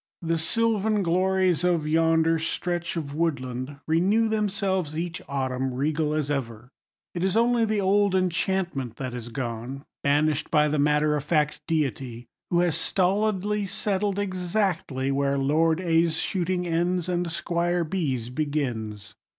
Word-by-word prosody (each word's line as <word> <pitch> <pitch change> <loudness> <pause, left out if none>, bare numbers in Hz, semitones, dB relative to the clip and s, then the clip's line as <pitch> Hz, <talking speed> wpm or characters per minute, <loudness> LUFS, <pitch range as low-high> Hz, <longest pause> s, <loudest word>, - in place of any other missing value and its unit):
The 165 0 0
sylvan 215 +3 +1
glories 185 0 +2
of 170 -4 +1
yonder 165 +1 +3
stretch 175 +1 -2
of 145 -3 -4
woodland 140 -4 -2
renew 190 +8 +3
themselves 195 -7 -1
each 170 +1 -3
autumn, 130 -1 -2
regal 150 +3 0
as 150 -2 -1
ever. 120 -3 -4 0.4
It 175 - -3
is 190 +2 +1
only 235 0 +3
the 215 -2 0
old 200 0 +3
enchantment 175 - -1
that 130 -1 -5
is 120 -1 -6
gone; 120 +3 -5 0.2
banished 145 +1 +1
by 150 -1 +3
the 150 0 0
matter 150 +1 +3
of 145 - -2
fact 150 -1 +1
deity, 130 -6 -2 0.2
who 175 0 +3
has 175 -3 +1
stolidly 205 +1 +1
settled 200 0 -1
exactly 180 -8 -1
where 140 0 +1
Lord 160 +4 +2
A.'s 165 -2 +2
shooting 180 -1 -1
ends 175 +1 0
and 175 -1 -1
Squire 175 +1 0
B.'s 145 -9 -2
begins. 125 -8 -3
165 Hz, 140 wpm, -26 LUFS, 140-185 Hz, 0.4 s, yonder